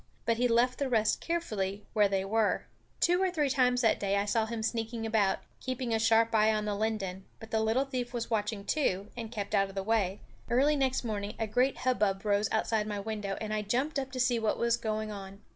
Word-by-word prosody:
But 230 -1 +2
he 245 +1 +3
left 240 +2 +2
the 280 -2 0
rest 220 -3 +2
carefully 210 - -2
where 210 -1 +4
they 195 -1 -1
were. 215 +1 +1 0.3
Two 355 +2 +3
or 380 - +3
three 300 -6 0
times 250 -2 +3
that 225 -3 +3
day 200 0 0
I 200 - +1
saw 220 +1 +1
him 225 -1 -4
sneaking 225 0 -2
about, 215 -3 +1 0.2
keeping 255 -2 -3
a 225 - +2
sharp 225 +1 +3
eye 220 0 +5
on 215 -1 -1
the 210 - -1
linden; 200 -3 -2
but 225 -1 -11
the 220 - +2
little 225 +5 +2
thief 250 -3 -3
was 240 -1 -4
watching 210 -2 -1
too, 205 -10 0
and 230 -2 -6
kept 205 -4 -4
out 195 0 +3
of 195 - -12
the 195 - -2
way. 205 -2 +1 0.3
Early 275 +5 +3
next 265 -2 +1
morning 210 -2 -3
a 225 - -1
great 250 +5 +1
hubbub 210 -6 0
rose 205 0 +2
outside 220 -1 0
my 205 -1 -3
window, 205 -1 -4
and 215 -1 -3
I 215 - 0
jumped 255 +8 0
up 265 -1 -5
to 255 - -4
see 245 -1 +2
what 220 -1 0
was 235 0 +2
going 215 -2 -3
on. 195 -1 -8
220 Hz, 230 wpm, -30 LUFS, 205-245 Hz, 0.3 s, eye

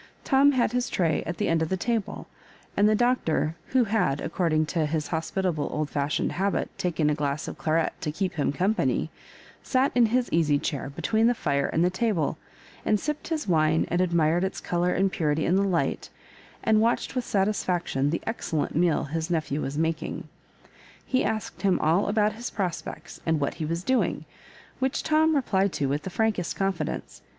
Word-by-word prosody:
Tom 280 +1 +4
had 245 -4 +2
his 245 0 -1
tray 165 -4 +1
at 175 - -3
the - - 0
end 165 -1 +2
of 160 - 0
the 190 - 0
table, 225 +1 -2 0.5
and 205 +1 +4
the 215 - +4
Doctor, 210 -10 +1
who 260 -1 +3
had, 195 -10 +1
according 160 -3 0
to 155 0 0
his 155 0 -2
hospitable 165 -1 -1
old 150 -1 -2
fashioned 145 0 0
habit, 195 +2 -1
taken 165 -4 0
a 150 - +3
glass 145 +1 -2
of - - -5
claret 160 0 +1
to 150 - -2
keep 185 +3 -2
him 145 -6 0
company," 190 +9 0 0.5
sat 265 +1 +1
in 240 -2 +5
his 245 +2 +1
easy 155 -3 +3
chair 140 -2 -3
between 220 +10 +1
the 245 - +3
fire 140 -7 0
and 165 +2 +1
the 180 - +2
table, 185 -7 0 0.4
and 210 - +2
sipped 300 +4 -3
his 315 -6 -2
wine, 160 -2 +3
and 175 +1 +1
admired 170 -1 +2
its 190 - -2
colour 175 +1 0
and 195 +1 +1
purity 155 -3 0
in 180 - +2
the 195 - +3
light, 190 -4 0 0.5
and 215 -1 +4
watched 230 +2 +1
with 255 -2 -1
satis 205 -1 0
Ikction 170 -6 0
the 165 - -2
excellent 175 -8 -2
meal 170 -1 +2
his 160 +3 -3
nephew 155 -3 -1
was 140 +2 -3
mak 160 0 0
ing. - - -6 0.8
He 255 - +1
asked 215 -1 -3
him 195 -2 +3
all 165 +6 +2
about 210 0 +2
his 235 +2 -5
prospects, 175 -3 -5
and 160 -1 +1
what 140 - -1
he - - 0
was 165 +3 -2
doing, 260 +3 0 0.5
which 265 0 0
Tom 315 0 +3
replied 200 -8 +1
to 145 - -1
with 145 +2 -1
the 190 - -5
frankest 210 -3 0
confidence. 190 -6 -3
175 Hz, 195 wpm, -26 LUFS, 155-215 Hz, 0.8 s, in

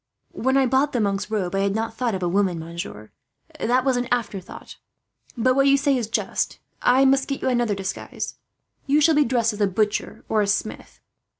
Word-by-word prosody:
"When 265 +2 +1
I 270 - +4
bought 265 +3 +2
the 245 - +1
monk's 200 0 -1
robe 195 -5 -2
I 195 - 0
had 200 0 0
not 225 0 -2
thought 235 -3 -1
of 185 - -4
a - - +1
woman, 185 -1 +1
monsieur. 160 -10 -7 0.5
That 250 +3 +1
was 260 -2 +2
an 245 0 -1
afterthought. 210 -6 -4 0.6
But 255 +2 +2
what 275 0 +4
you 275 0 +5
say 280 -1 +2
is 240 -4 -1
just. - - -1 0.2
I 260 +2 +4
must 270 0 +3
get 275 - -4
you - - +2
another 240 -4 +1
disguise. 195 -1 -5 0.5
You 285 +2 +4
shall 315 +2 +4
be 300 -1 +4
dressed 230 -2 +1
as 210 - -6
a 205 - +4
butcher, 210 +2 -2
or 215 - +2
a 205 - 0
smith." 210 +2 -3
230 Hz, 210 wpm, -23 LUFS, 200-265 Hz, 0.6 s, you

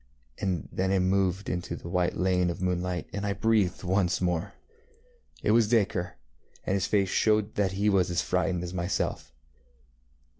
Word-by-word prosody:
And 90 -6 -2
then 95 +1 -1
it 95 - +3
moved 95 +1 +1
out - - -1
into 90 -1 -4
the 85 - -9
white 90 0 0
lane 90 -1 +2
of 85 - -4
moonlight, 90 -2 -1
and 100 - -3
I 100 -1 0
breathed 105 -5 +1
once 90 -1 +1
more. 90 -2 -1 0.9
It - - +3
was 115 -1 +4
Dacre, 100 -6 +1 0.5
and - - 0
his 95 -1 0
face 100 -3 +2
showed 110 0 +2
that 95 -2 0
he 100 +2 0
was 95 -4 +3
as 85 -1 0
frightened 90 -1 0
as 90 0 -5
myself. 90 -7 -2
95 Hz, 175 wpm, -28 LUFS, 90-100 Hz, 0.9 s, was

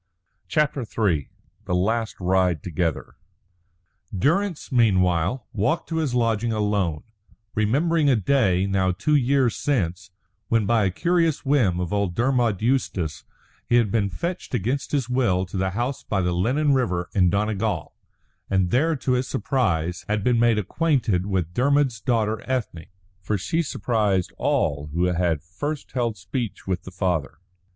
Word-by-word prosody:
CHAPTER 150 -3 +1
III 100 - -1 0.4
THE 90 - -1
LAST 110 +5 0
RIDE 90 -3 +1
TOGETHER 85 -2 -3 1.0
Durrance, 170 - 0
meanwhile, 95 -2 +2
walked 110 - 0
to 165 - -2
his 150 -6 0
lodging 115 -1 +1
alone, 105 -7 0 0.5
remembering 145 +8 +2
a 130 - +5
day, 100 -5 +2
now 95 -1 +1
two 105 +12 -1
years 135 -3 +3
since, 100 - -1 0.4
when 115 -2 +2
by 110 0 +2
a - - +2
curious 165 - +1
whim 120 -11 +2
of 90 +1 -3
old 100 -4 0
Dermod 120 -5 +1
Eustace 110 - -1 0.4
he 120 - +4
had 115 -4 +3
been 105 -4 +1
fetched 170 - -4
against 125 +6 -2
his 140 -5 0
will 120 -8 +1
to 90 - -10
the 95 0 0
house 120 +8 -2
by 100 - -2
the 90 -1 0
Lennon 135 - +2
River 90 -10 0
in 90 -3 +4
Donegal, 105 -2 -1 0.6
and 95 -2 +1
there, 155 +6 +2
to 135 -2 -2
his 125 0 +1
surprise, 90 - -1
had 105 -1 0
been 120 0 +2
made 120 -2 +4
acquainted 110 - 0
with 90 -4 -1
Dermod's 135 -1 +2
daughter 110 -4 0
Ethne. 110 -11 -3 0.3
For 105 +4 -1
she 160 - -1
surprised 105 - 0
all 70 -1 0
who 85 +2 +1
had 85 -4 +1
first 140 - -5
held 120 -4 -1
speech 100 +5 -5
with 95 -2 -3
the 95 - -8
father. 90 -5 -2
105 Hz, 150 wpm, -24 LUFS, 90-130 Hz, 1.0 s, a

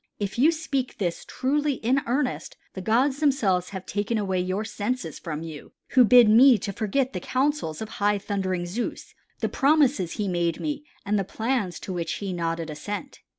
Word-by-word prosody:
If 200 +2 -4
you 300 +6 +6
speak 275 -6 -3
this 175 -4 -2
truly 290 +3 0
in 260 +2 +1
earnest, 255 +2 -1 0.2
the 190 - -6
gods 260 +8 +2
themselves 210 - +2
have 190 -2 -7
taken 205 +3 -1
away 190 -3 0
your 185 +4 -1
senses 245 +4 -3
from 160 -2 -5
you 155 -3 -9 0.2
who 255 - +6
bid 245 0 +7
me 240 +3 +7
to 200 - -5
forget 245 +6 -1
the 180 - -2
counsels 260 - -1
of 220 - -8
high 205 0 +3
thundering 190 -3 -2
Zeus, 205 +8 -4 0.3
the - - +1
promises 275 - +2
he 210 - -2
made 175 -3 0
me 300 -1 -3 0.2
and 205 +1 +1
the - - 0
plans 220 -2 -2
to 190 - -5
which 170 -2 -2
he 195 -2 -4
nodded 165 -2 -2
assent. 205 - -6
210 Hz, 185 wpm, -25 LUFS, 185-260 Hz, 0.3 s, bid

